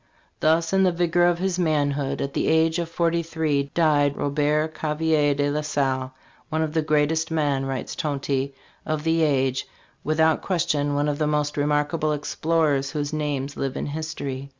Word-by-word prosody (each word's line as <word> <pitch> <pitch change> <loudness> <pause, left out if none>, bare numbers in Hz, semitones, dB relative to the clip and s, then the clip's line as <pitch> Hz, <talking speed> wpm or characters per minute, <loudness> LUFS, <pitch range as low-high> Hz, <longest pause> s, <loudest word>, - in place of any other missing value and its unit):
"Thus 165 +2 +2
in 195 - +4
the 185 -1 +4
vigor 175 0 +2
of 175 -1 +2
his 185 0 -1
manhood, 145 -4 0
at 140 0 -4
the - - 0
age 160 +1 +3
of 170 -1 -3
forty 170 0 +1
three, 155 -4 -1
died 145 -4 +3
Robert 150 +2 0
Gavelier 155 -1 +1
de 145 0 0
la 150 +1 -1
Salle, 135 -3 -1 0.2
' - - -32
one 160 0 0
of 155 -1 -3
the 160 - +2
greatest 155 +1 +1
men,' 145 -4 0
writes 135 -1 -4
Tonty, 140 -2 -2 0.3
'of 155 -1 -2
the 165 0 +2
age'; 135 -4 +1 0.4
without 160 +1 +2
question 145 -5 0
one 145 +1 +1
of 145 0 -1
the 155 - +1
most 150 -1 0
remarkable 150 +1 +1
explorers 150 -2 0
whose 145 0 -3
names 145 -2 -2
live 135 -1 -3
in - - -3
history." 140 -3 -5
150 Hz, 175 wpm, -24 LUFS, 145-160 Hz, 0.4 s, in